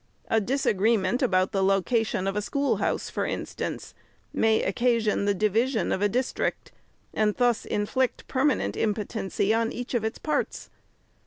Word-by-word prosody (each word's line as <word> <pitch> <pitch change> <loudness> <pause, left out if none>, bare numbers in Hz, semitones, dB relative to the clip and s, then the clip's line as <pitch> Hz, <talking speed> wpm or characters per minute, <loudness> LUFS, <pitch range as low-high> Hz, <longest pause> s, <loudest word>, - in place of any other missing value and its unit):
A 225 - +3
disagreement 225 -2 +1
about 185 -7 +2
the 195 -2 +1
location 195 +1 +1
of 195 0 -1
a 210 - 0
schoolhouse, 280 +6 0
for - - -3
instance, - - -4 0.4
may 220 0 +2
occasion 225 0 +1
the 205 0 +2
division 220 +5 +1
of 190 - -1
a 205 - +3
district, 250 +5 -2 0.4
and 210 -1 +1
thus 245 -3 +1
inflict 240 +5 -1
permanent 270 +2 +1
impotency 210 -1 -1
upon 225 0 +1
each 245 +1 -6
of 235 -3 +1
its 220 +1 -2
parts. 305 - -2
220 Hz, 145 wpm, -26 LUFS, 200-245 Hz, 0.4 s, A